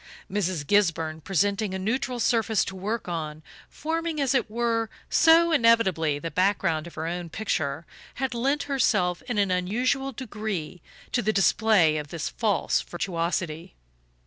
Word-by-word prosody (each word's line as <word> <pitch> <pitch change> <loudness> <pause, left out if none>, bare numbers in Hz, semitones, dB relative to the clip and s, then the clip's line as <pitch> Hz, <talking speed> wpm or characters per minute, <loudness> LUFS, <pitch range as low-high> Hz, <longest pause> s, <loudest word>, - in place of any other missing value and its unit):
Mrs. 185 -6 -1
Gisburn, 165 -5 +1
presenting 200 +3 0
a - - -1
neutral 240 +5 -2
surface 225 -2 +2
to 190 - -6
work 210 +4 -3
on 155 -3 -4 0.3
forming, 325 0 -3
as 275 -2 +1
it 245 -5 +1
were, 230 0 0 0.2
so 330 +1 +6
inevitably 230 - +3
the 165 +3 -5
background 180 -4 +1
of 170 - -12
her 160 - -4
own 175 0 -4
picture 155 -6 -2 0.3
had 265 -1 -2
lent 275 +5 0
herself 210 -10 +1
in 240 - -1
an 200 -2 +2
unusual 245 +9 0
degree 210 - -5 0.3
to 245 - +1
the 215 - +1
display 195 -5 +3
of 150 -1 -4
this 165 +1 -4
false 210 -5 0
virtuosity. 170 -1 -3
200 Hz, 145 wpm, -26 LUFS, 170-235 Hz, 0.3 s, so